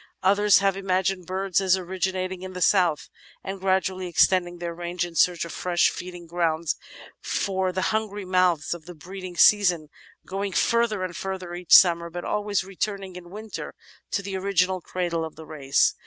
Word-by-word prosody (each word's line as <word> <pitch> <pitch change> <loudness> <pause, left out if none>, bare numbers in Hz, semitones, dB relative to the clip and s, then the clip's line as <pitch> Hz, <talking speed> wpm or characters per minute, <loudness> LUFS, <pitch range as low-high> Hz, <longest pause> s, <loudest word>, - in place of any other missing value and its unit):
Others 200 +1 +5
have 195 -1 +2
imagined 190 -2 -1
birds 190 0 0
as 190 -1 +3
originating 185 0 -3
in 185 0 -7
the 180 - -6
south 170 -6 +2 0.4
and 195 0 -5
gradually 190 -1 0
extending 175 0 +2
their 170 0 -4
range 175 +1 -3
in 175 - -9
search 175 +1 +2
of 170 - -8
fresh 175 -1 +2
feeding 175 -1 -8
grounds 165 -2 0 0.5
for 190 -1 -1
the 185 +1 -2
himgry 210 -2 -2
mouths 180 -4 +2
of 170 -2 -10
the 175 - -9
breeding 185 +2 -9
season, 180 -7 +4 0.4
going 195 +1 -3
further 230 -1 +1
and 180 -2 -4
further 185 -2 -5
each 175 -1 +5
summer, 170 -2 +6
but 175 +1 -6
always 205 -2 -1
returning 195 0 -4
in 175 -1 -10
winter 215 +3 -7 0.3
to 200 - -2
the 195 0 -5
original 190 -1 +1
cradle 170 -2 -2
of 160 - -7
the 160 - -11
race. 140 -3 +1
185 Hz, 170 wpm, -25 LUFS, 175-195 Hz, 0.5 s, summer